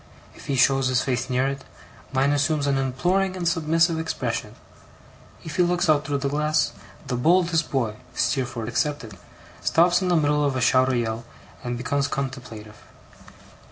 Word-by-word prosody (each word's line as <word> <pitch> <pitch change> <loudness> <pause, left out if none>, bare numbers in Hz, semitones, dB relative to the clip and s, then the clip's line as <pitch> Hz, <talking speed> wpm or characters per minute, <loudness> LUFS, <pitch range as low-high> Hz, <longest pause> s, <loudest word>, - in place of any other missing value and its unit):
If - - -14
he 140 - 0
shows 135 +1 +3
his 130 0 +1
face 130 0 -2
near 130 +1 +1
it, 135 0 -4 0.5
mine 135 +1 +2
assumes 145 0 +1
an 140 -1 +1
imploring 180 +9 0
and 175 -2 -2
submissive 165 0 +2
expression. 160 0 -3 0.9
If 160 - -7
he - - +4
looks 175 0 +1
out 150 -1 +1
through 145 -1 0
the 140 0 -2
glass, 150 +1 +1 0.3
the 125 - -2
boldest 165 +4 +2
boy 115 -6 -1 0.2
(Steerforth 125 -5 -1
excepted) 125 -3 -2 0.5
stops 175 +2 +3
in 185 - -1
the 180 - +3
middle 150 -2 +2
of 140 -2 0
a - - 0
shout 130 +1 +4
or 130 - +1
yell, 115 -1 -2 0.4
and 120 0 -3
becomes 140 +3 -1
contemplative. 120 -6 -6
140 Hz, 165 wpm, -24 LUFS, 130-160 Hz, 0.9 s, he